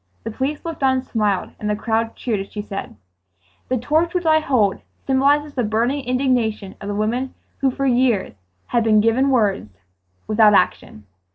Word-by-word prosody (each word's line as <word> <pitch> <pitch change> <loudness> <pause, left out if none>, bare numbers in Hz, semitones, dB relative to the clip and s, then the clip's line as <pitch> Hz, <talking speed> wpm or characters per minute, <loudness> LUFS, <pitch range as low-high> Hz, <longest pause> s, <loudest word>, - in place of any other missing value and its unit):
The 225 - -4
police 270 +8 -3
looked 330 -3 -5
on 265 -1 +3
and 260 - -4
smiled, 210 -4 -1
and 210 - -3
the 210 - +1
crowd 225 +1 -1
cheered 225 -5 -2
as 195 - -7
she 210 - -5
said: 200 -1 -7 0.7
"The 255 - +1
torch 315 +8 0
which 355 -1 -1
I 315 0 +5
hold 235 -10 +1 0.2
symbolizes 285 +2 +2
the 255 - -1
burning 235 +6 0
indignation 245 -6 0
of 200 - -6
the 205 - -3
women 235 +5 -2 0.2
who 275 - +2
for 275 +2 -3
years 245 -5 +1 0.3
have 235 -1 +1
been 215 -1 +4
given 230 +5 +2
words 200 - 0 0.5
without 215 -1 +5
action 110 - 0
235 Hz, 180 wpm, -20 LUFS, 210-270 Hz, 0.7 s, I